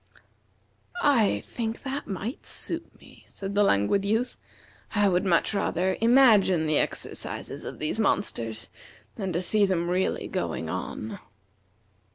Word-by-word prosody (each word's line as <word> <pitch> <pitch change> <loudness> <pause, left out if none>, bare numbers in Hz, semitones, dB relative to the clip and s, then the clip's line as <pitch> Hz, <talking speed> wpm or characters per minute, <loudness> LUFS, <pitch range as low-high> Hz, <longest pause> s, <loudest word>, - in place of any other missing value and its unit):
"I 245 -8 +3
think 225 -1 -5
that 275 +1 -4
might 205 +5 -5
suit - - -2
me," - - -18
said 195 0 -6
the 205 - +3
Languid 195 - +3
Youth. 220 +5 0 0.6
"I 205 -1 +4
would 180 -1 +2
much 175 +2 +2
rather 190 -2 0
imagine 225 -9 +5
the 155 -1 +2
exercises - - -3
of - - -6
these 155 +8 -2
monsters 115 - -1 0.4
than 195 -3 -4
to 175 +2 -1
see 210 +3 +2
them 175 -2 0
really 185 +1 0
going - - -3
on." 110 - -5
195 Hz, 135 wpm, -27 LUFS, 175-220 Hz, 0.6 s, imagine